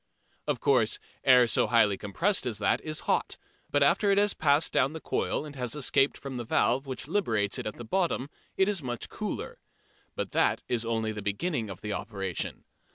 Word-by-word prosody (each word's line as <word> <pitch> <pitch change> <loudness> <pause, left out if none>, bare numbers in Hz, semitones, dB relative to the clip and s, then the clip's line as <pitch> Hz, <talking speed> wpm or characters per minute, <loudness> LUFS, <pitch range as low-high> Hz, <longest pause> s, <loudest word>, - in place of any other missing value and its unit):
Of - - 0
course 125 -6 +2 0.3
air 125 -2 +7
so 115 - +2
highly 105 -4 +4
compressed 165 - 0
as 115 -4 -2
that 105 - +1
is 155 -1 -4
hot, - - 0 0.3
but 145 -1 +3
after 200 +8 +3
it 200 - +4
has 205 0 +4
passed 145 +1 +2
down 140 - +2
the 160 - -5
coil 155 - -1
and 145 -1 -9
has 125 -1 -2
escaped 135 -1 +2
from 135 -2 -6
the 120 - -3
valve 125 +4 +1
which 130 0 -4
liberates 115 - 0
it - - -4
at 105 - -5
the 120 - -8
bottom 170 -2 0 0.3
it 190 - +4
is 205 -5 -1
much 120 -3 -4
cooler. - - -5 0.6
But - - -3
that - - +2
is 120 -2 -1
only 110 -1 -1
the 105 -1 -6
beginning 110 - -2
of 95 - -8
the 105 -1 -3
operation. 95 -5 -4
125 Hz, 200 wpm, -28 LUFS, 110-150 Hz, 0.6 s, air